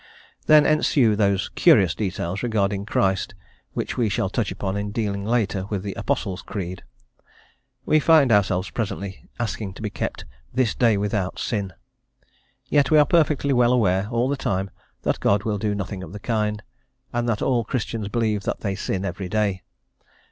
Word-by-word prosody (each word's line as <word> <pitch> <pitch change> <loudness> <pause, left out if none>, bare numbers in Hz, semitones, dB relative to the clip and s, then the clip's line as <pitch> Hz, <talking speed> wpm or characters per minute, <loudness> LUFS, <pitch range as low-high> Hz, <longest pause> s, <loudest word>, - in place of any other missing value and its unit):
Then 155 -1 +7
ensue 135 -7 +3
those 100 -3 +1
curious 95 -4 +4
details 95 -2 -3
regarding 100 -4 0
Christ 95 -3 0 0.4
which - - -3
we 115 -4 +2
shall 95 -1 0
touch 110 -3 -1
upon 95 0 -3
in 100 0 -2
dealing 100 -2 -2
later 105 -4 0
with 100 -3 -3
the 100 -1 -4
Apostles' 95 -1 -2
Creed. 95 -2 -5 1.0
We 155 - +4
find 150 -4 +5
ourselves, 95 -2 +2
presently, 100 -3 -5
asking 105 -4 -3
to 110 - -9
be 105 - -3
kept - - -4 0.3
"this 125 -2 +1
day 115 -4 +3
without 100 -2 -1
sin;" 100 -4 -2 0.9
yet, 140 -2 +2
we 155 - +5
are 150 - +7
perfectly 150 -5 +2
well 120 -1 +4
aware, 95 -5 +2
all 120 +1 +1
the 140 - 0
time, 95 -7 -2 0.3
that - - 0
God 100 0 +2
will 105 -2 -1
do 105 0 -1
nothing 100 -1 -4
of 95 0 -9
the 105 - -7
kind, 105 -1 -1 0.5
and 120 0 0
that 110 -3 -1
all 125 -3 +2
Christians 115 -2 -3
believe 110 -1 0
that - - -3
they 100 -3 -1
sin 95 -1 -3
every 95 0 -4
day. 100 -3 0
105 Hz, 170 wpm, -23 LUFS, 95-120 Hz, 1.0 s, Then